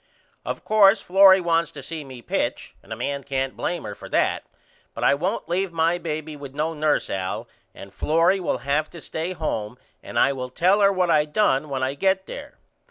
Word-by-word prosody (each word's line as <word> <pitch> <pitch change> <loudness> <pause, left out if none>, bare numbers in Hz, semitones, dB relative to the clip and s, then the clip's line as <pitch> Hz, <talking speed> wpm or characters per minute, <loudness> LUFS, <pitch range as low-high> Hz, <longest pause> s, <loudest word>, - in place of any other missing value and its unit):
Of - - -5
course 210 -1 +5
Florrie 190 +1 +6
wants 165 -2 +1
to 140 - -9
see 160 +2 -6
me 130 -3 -11
pitch - - -2
and - - -19
a - - -2
man 140 +4 -3
can't 135 0 -2
blame 175 - -3
her 105 - -6
for - - -11
that - - +1 0.5
but - - -5
I - - +5
won't 180 +9 -2
leave 180 +2 -1
my 165 +1 +1
baby 155 -2 -5
with 140 -2 -10
no 155 +2 -1
nurse 155 -1 +1
Al 95 -1 -4 0.3
and 100 0 -11
Florrie 165 - +2
will 180 - -1
have 150 +2 0
to 170 - -11
stay 165 +3 -4
home 120 -9 -3 0.2
and - - -7
I 140 - +4
will 130 -1 -5
tell 185 +10 +2
her 200 0 +5
what 185 -3 +1
I 150 -1 +4
done 150 -3 +1
when 135 -1 -2
I 130 +1 0
get 190 +5 +1
there. 285 +6 -9
155 Hz, 210 wpm, -23 LUFS, 140-180 Hz, 0.5 s, Florrie